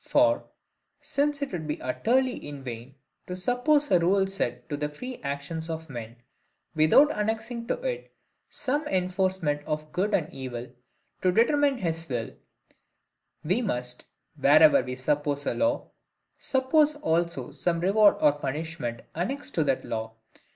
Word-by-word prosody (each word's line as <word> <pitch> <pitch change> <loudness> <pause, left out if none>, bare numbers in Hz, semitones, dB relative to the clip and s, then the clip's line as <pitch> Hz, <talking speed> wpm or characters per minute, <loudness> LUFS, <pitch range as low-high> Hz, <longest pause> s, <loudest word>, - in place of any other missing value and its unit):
For, 295 0 +3 0.6
since 295 -1 0
it 280 - -4
would 165 -4 -4
be 150 - -3
utterly 250 - +1
in 145 -2 -8
vain 120 +1 -7 0.3
to 180 - -4
suppose 265 +9 +2
a 180 - +6
rule 190 +3 +3
set 125 -11 -3
to 145 - -1
the 150 0 -2
free 250 +12 -7
actions 140 +4 -4
of 160 -2 -5
men, 115 -2 -7 0.6
without 160 - +6
annexing 225 +2 -2
to - - +1
it - - -3 0.4
some 290 +4 -2
enforcement 185 -4 0
of 150 0 -3
good 200 +6 +1
and 160 -4 -2
evil 125 -2 -6 0.5
to 185 - +3
determine 280 +6 +3
his 165 -5 -3
will, 120 -3 -2 1.1
we 185 +10 +1
must, 125 - -3 0.3
wherever 150 +1 +6
we 125 0 -5
suppose 145 +2 -1
a - - 0
law, 290 +1 0 0.5
suppose 290 +3 +2
also 170 - -1
some 170 -1 -1
reward 200 +4 +5
or 150 - +6
punishment 145 -3 -4
annexed 260 - -3
to 160 - +2
that 135 -2 0
law. 110 0 -4
170 Hz, 145 wpm, -27 LUFS, -, 1.1 s, a